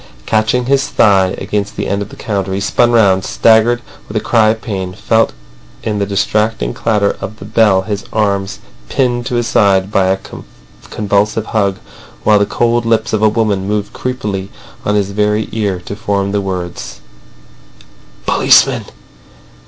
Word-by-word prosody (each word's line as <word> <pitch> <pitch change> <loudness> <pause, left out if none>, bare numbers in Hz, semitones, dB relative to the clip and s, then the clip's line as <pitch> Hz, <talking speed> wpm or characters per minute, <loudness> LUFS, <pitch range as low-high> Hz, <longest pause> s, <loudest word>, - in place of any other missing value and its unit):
Catching 110 +3 +1
his 135 +1 +2
thigh 95 -4 +3
against 105 +1 -3
the - - -2
end 100 0 -1
of 100 - -5
the - - -11
counter, 100 -3 -3
he - - -1
spun 120 +4 +2
round, 100 -5 +4
staggered 115 +3 +3 0.2
with 105 - -4
a - - +3
cry 110 -1 +3
of 110 +1 0
pain, 95 -5 -4
felt 110 +2 +1 0.5
in 105 -2 -2
the 100 - -1
distracting 100 - 0
clatter 105 -3 0
of 110 +2 -6
the 95 - -10
bell 105 -3 +3
his 100 0 -4
arms 100 -2 -1 0.3
pinned 120 -2 0
to 125 - -2
his 120 -1 0
side 100 -3 +2
by 95 -2 +2
a 95 +1 +2 0.7
convulsive 105 +1 0
hug, 100 -4 0 0.5
while 105 -1 +4
the 100 - +1
cold 120 +1 +1
lips 115 0 0
of 110 - +1
a 110 - +5
woman 105 -3 0
moved 105 -1 -2
creepily 105 -7 -4 0.4
on 105 - +1
his 100 -1 0
very 105 +1 0
ear 100 -5 -1
to 100 - -5
form 100 -2 -1
the 100 0 0
words: 90 -3 -5 1.2
"Policeman! - - +4
105 Hz, 165 wpm, -15 LUFS, 100-110 Hz, 1.2 s, a